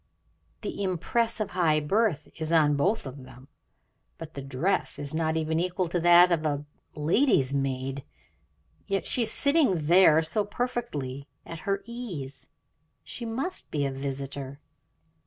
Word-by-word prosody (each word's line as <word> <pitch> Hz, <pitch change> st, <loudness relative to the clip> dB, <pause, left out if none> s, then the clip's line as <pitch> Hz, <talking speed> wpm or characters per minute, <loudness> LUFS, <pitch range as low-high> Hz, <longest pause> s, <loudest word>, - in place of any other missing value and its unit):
The -, -, -5 dB
impress 225 Hz, +5 st, 0 dB
of 210 Hz, -2 st, -2 dB
high 165 Hz, -4 st, +2 dB
birth 170 Hz, 0 st, 0 dB
is 160 Hz, 0 st, -2 dB
on 150 Hz, -3 st, +4 dB
both 175 Hz, +9 st, +1 dB
of 135 Hz, 0 st, -8 dB
them, 130 Hz, +2 st, -15 dB, 0.7 s
but 160 Hz, -1 st, -9 dB
the 140 Hz, -, -6 dB
dress 135 Hz, +8 st, 0 dB
is 145 Hz, 0 st, -4 dB
not 160 Hz, 0 st, 0 dB
even 160 Hz, 0 st, 0 dB
equal 180 Hz, +1 st, -1 dB
to 175 Hz, -, 0 dB
that 175 Hz, +1 st, +7 dB
of 165 Hz, -2 st, +1 dB
a 145 Hz, -1 st, -1 dB, 0.3 s
lady's 150 Hz, -, +2 dB
maid, 135 Hz, 0 st, -2 dB, 0.8 s
yet 195 Hz, -1 st, -1 dB
she 250 Hz, -, +1 dB
is 225 Hz, -, +2 dB
sitting 280 Hz, -, +3 dB
there 160 Hz, 0 st, +5 dB
so 185 Hz, +7 st, 0 dB
perfectly 200 Hz, -, -4 dB, 0.2 s
at 165 Hz, -, -8 dB
her 195 Hz, 0 st, 0 dB
ease, 190 Hz, -, -6 dB, 0.6 s
she 235 Hz, -, -6 dB
must 260 Hz, +11 st, -3 dB
be 145 Hz, -2 st, -1 dB
a 135 Hz, -, -1 dB
visitor. 135 Hz, 0 st, -5 dB
160 Hz, 150 wpm, -27 LUFS, 140-195 Hz, 0.8 s, that